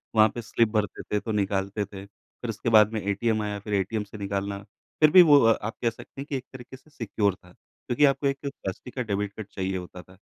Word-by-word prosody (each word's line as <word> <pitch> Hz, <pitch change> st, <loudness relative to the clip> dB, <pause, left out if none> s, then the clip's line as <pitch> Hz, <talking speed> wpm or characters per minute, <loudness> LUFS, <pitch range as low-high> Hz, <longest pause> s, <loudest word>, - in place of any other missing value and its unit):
वहाँ 110 Hz, 0 st, +6 dB
pay 120 Hz, -, -3 dB
slip 115 Hz, +1 st, +1 dB
भरते 105 Hz, -4 st, -1 dB
थे 105 Hz, -, -1 dB
तो 110 Hz, -, -5 dB
निकालते 100 Hz, 0 st, -1 dB
थे। 100 Hz, 0 st, -10 dB
फिर 110 Hz, +3 st, -12 dB
उसके 115 Hz, +2 st, -2 dB
बाद 110 Hz, -1 st, +6 dB
में 110 Hz, -, -2 dB
एटीएम 110 Hz, +3 st, 0 dB
आया, 105 Hz, -1 st, -3 dB
फिर 105 Hz, +1 st, -6 dB
एटीएम 100 Hz, +2 st, 0 dB
से 105 Hz, +1 st, -11 dB
निकालना, 100 Hz, 0 st, -3 dB, 0.4 s
फिर 155 Hz, -1 st, +6 dB
भी 185 Hz, -, +10 dB
वो 145 Hz, -4 st, +7 dB
अ, 115 Hz, -2 st, +4 dB
आप 115 Hz, +3 st, -4 dB
कह 120 Hz, -, +2 dB
सकते 120 Hz, +4 st, -11 dB
हैं -, -, -6 dB
कि 140 Hz, -, -2 dB
एक 125 Hz, -, -8 dB
तरीक़े 130 Hz, +1 st, -10 dB
से 150 Hz, -, -25 dB
सिक्योर 105 Hz, -7 st, -1 dB
था, 90 Hz, -1 st, -20 dB
क्योंकि 125 Hz, +4 st, -1 dB
आपको 140 Hz, 0 st, +2 dB
एक 135 Hz, 0 st, 0 dB
प्लास्टिक 125 Hz, -4 st, -6 dB
का 130 Hz, -, -2 dB
डेबिट 100 Hz, -2 st, -2 dB
कार्ड 110 Hz, -1 st, -8 dB
चाहिए 95 Hz, -1 st, -2 dB
होता 90 Hz, 0 st, -8 dB
था 95 Hz, +2 st, -19 dB
105 Hz, 245 wpm, -26 LUFS, 100-120 Hz, 0.4 s, भी